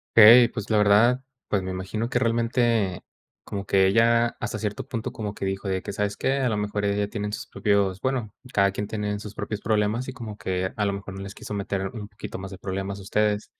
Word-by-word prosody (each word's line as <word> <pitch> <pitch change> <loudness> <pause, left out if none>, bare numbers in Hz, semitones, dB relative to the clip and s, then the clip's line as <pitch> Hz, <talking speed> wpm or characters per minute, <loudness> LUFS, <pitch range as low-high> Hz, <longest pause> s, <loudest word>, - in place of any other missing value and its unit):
Ey, 115 +2 +10
pues, 105 -3 -6
la 110 - +3
verdad, 110 +5 +5 0.2
pues, 100 -2 0
me 95 - -4
imagino 95 +5 -3
que 120 - 0
realmente, 115 -4 +1 0.4
como 100 -1 -5
que 95 0 +4
ella, 115 +3 +3
hasta 105 - -3
cierto 105 -2 -3
punto, 115 -2 -4
como 105 -2 -5
que - - -8
dijo 95 +1 -2
de 95 -1 0
que, - - -5
¿sabes 100 0 -2
qué? 130 - +1
A 130 -3 +1
lo 105 - 0
mejor 105 0 -1
ella 100 0 +1
tiene 105 -1 -3
sus - - -5
propios, 100 -2 +1
bueno, 125 -5 -1 0.2
cada 100 -1 +4
quien 105 +1 -3
tiene 105 -1 -2
sus 105 0 -8
propios 105 -1 -4
problemas 110 +3 0
y 130 - -5
como 110 -5 -7
que, 95 0 -2
a 105 - +1
lo 100 - 0
mejor 100 -1 -7
no 95 - -6
les 100 +1 -7
quiso 105 - -7
meter 100 -1 -2
un 105 -2 -7
poquito 105 - -8
más 95 +1 -7
de 95 - -9
problemas 95 +1 -4
a - - -9
ustedes. 105 +1 +1
105 Hz, 235 wpm, -25 LUFS, 100-115 Hz, 0.4 s, Ey